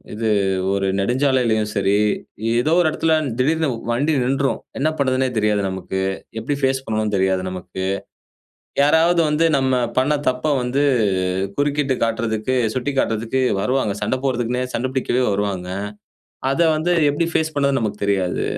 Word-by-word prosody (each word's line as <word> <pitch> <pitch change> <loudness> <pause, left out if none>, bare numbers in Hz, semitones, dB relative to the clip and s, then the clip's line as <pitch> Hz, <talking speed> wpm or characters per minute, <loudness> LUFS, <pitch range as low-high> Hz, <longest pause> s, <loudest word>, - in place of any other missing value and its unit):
இது 110 +1 -1 0.4
ஒரு 100 -1 0
நெடுஞ்சாலையிலேயும் 120 -1 +1
சரி, 100 0 +2 0.6
ஏதோ 155 - 0
ஒரு 175 - +2
இடத்துல 160 +1 +1 0.3
திடீர்னு 160 +3 +2 0.2
வண்டி 145 +6 +1
நின்றும், 135 +1 0 0.2
என்ன 150 +3 +2
பண்ணுறதுன்னே 130 -1 +1
தெரியாது 105 -1 +1
நமக்கு. 95 0 -4 0.4
எப்படி 140 +5 -2
ஃபேஸ் 135 0 0
பண்ணணு 110 -1 -1
தெரியாது 95 0 +1
நமக்கு. 95 +1 -5 1.0
யாராவது 165 +4 +4
வந்து 150 +2 +2
நம்ம 130 -1 +1 0.2
பண்ண 140 +4 +2
தப்பை 130 +4 0
வந்து, 125 +3 0 0.8
குறுக்கிட்டு 145 -1 +1
காட்டுறதுக்கு, 115 +1 -1 0.2
சுட்டிக்காட்டுறதுக்கு 130 -2 -1 0.2
வருவாங்க 125 -4 0
சண்டை 130 - -1
போடுறதுக்குன்னே 125 -1 0
சண்டை 130 +3 -1
பிடிக்கவே 130 -1 0
வருவாங்க. 100 -2 -2 0.8
அதை 165 +5 +2
வந்து 160 +3 0 0.2
எப்படி 145 +4 0
ஃபேஸ் 160 -1 0
பண்ணுறதுனு 140 -2 +1
நமக்கு 105 -2 -3
தெரியாது, 95 -3 0
130 Hz, 130 wpm, -20 LUFS, 105-140 Hz, 1.0 s, யாராவது